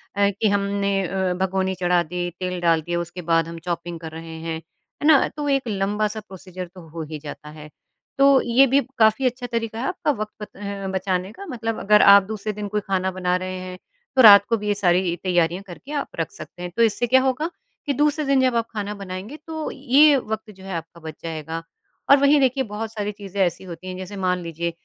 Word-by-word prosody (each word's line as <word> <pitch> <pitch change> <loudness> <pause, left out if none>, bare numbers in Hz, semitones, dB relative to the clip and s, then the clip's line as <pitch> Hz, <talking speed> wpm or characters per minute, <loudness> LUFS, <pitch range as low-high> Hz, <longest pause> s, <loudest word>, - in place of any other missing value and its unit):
अ, 200 0 +3
कि 205 +2 0
हमने 200 0 0 0.2
अ, 190 0 -1
भगोनी 190 0 0
चढ़ा 180 -1 +2
दी, 175 +2 -3
तेल 180 -1 -3
डाल 165 -2 +3
दिया 175 +2 -2
उसके 175 +1 -6
बाद 165 0 +3
हम 165 0 -7
चॉपिंग 170 0 -4
कर 160 -1 -8
रहे 165 0 -8
हैं, 165 0 -3 0.5
है - - +3
ना? 310 -4 +6
तो 295 - -2
एक 275 -3 +1
लंबा 205 +1 0
सा 215 +1 -6
प्रोसीजर 185 -1 -8
तो 175 -3 -12
हो 160 0 -6
ही 155 - -5
जाता 150 0 -8
है। 150 0 -11 0.5
तो 275 -1 +6
ये 255 +3 +4
भी 270 +3 +4 0.2
काफ़ी 220 +3 +4
अच्छा 250 0 -1
तरीका 230 -1 -2
है 250 - -2
आपका - - 0
वक़्त 215 0 -6
ब 200 -1 -5
बचाने 185 0 -1
का। 395 - -10
मतलब 225 -4 -3
अगर 210 +1 +5
आप 200 0 +8
दूसरे 215 +1 -4
दिन 210 0 -5
कोई 210 +1 -1
खाना 190 -1 -1
बना 180 -1 0
रहे 185 0 -5
हैं, 185 0 -7 0.4
तो 260 - +6
रात 200 -3 +10
को 230 - +2
भी 210 0 -5
ये 205 - +3
सारी 180 -2 +2
तैयारियाँ 175 0 +1
करके 180 +11 -11
आप 290 -2 -2
रख 165 - -2
सकते 175 - -11
हैं। 180 - -5
तो 235 - +5
इससे 230 +2 +1
क्या 260 +2 +5
होगा, 265 +5 0 0.4
कि 285 - 0
दूसरे 300 +2 +1
दिन 275 -1 +3
जब 255 -2 +2
आप 230 -1 +1
खाना 210 -1 -3
बनाएँगे 195 +6 -7
तो 315 -1 -4
ये 285 +2 +5
वक़्त 220 -3 -4
जो 190 - -15
है 190 -1 -6
आपका 165 +1 -7
बच 160 -1 -7
जाएगा। 160 0 -5 0.5
और 280 - +9
वही 280 +1 +5
देखिए 265 0 +2
बहुत 215 +1 -4
सारी 210 -1 -3
चीज़ें 200 -1 -5
ऐसी 180 0 0
होती 180 0 -9
हैं, 185 - -5
जैसे 185 +2 -7
मान 180 -1 0
लीजिए 170 +1 -3
200 Hz, 225 wpm, -23 LUFS, 180-230 Hz, 0.5 s, रात